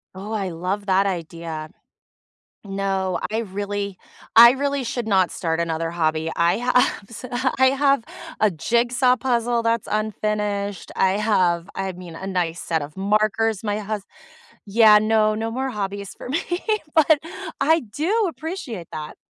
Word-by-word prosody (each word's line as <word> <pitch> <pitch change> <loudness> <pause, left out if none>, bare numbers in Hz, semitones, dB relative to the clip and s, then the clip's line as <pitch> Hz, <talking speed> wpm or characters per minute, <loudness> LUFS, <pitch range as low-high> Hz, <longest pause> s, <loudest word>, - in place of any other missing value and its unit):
Oh, 200 +3 -7
I 200 -4 -2
love 185 +5 -3
that 195 +1 +3
idea. 165 -3 -4 0.9
No, 195 -2 -1
I 220 - 0
really 200 -2 -4 0.4
I 235 +1 +10
really 280 0 -1
should 235 -1 -3
not 190 -3 +3
start 165 -1 -2
another 165 0 -1
hobby, 160 -1 0
I 170 +3 +2
have 250 -1 +2
so 230 +3 -8 0.3
I 260 - +5
have 275 -3 +2 0.4
a 215 -2 +3
jigsaw 240 - +2
puzzle 240 -2 0
that's 230 -1 0
unfinished, 210 -2 -2
I 190 0 +3
have 185 -5 +1
I 195 0 -3
mean, 175 -2 -10
a 190 - -6
nice 175 -3 -1
set 160 -3 -1
of 150 +1 -10
markers, 215 +2 +1
my 205 0 -1
hus 210 -1 -4 0.6
Yeah, 210 +1 +6
no, 215 0 +2
no 225 +1 -3
more 265 +2 -2
hobbies 200 -1 -4
for - - -8
me, 295 - +1 0.6
but 315 -1 +5 0.4
I 320 +3 +3
do 350 - 0
appreciate 310 - -6
that. 155 -1 -6
205 Hz, 150 wpm, -22 LUFS, 185-235 Hz, 0.9 s, I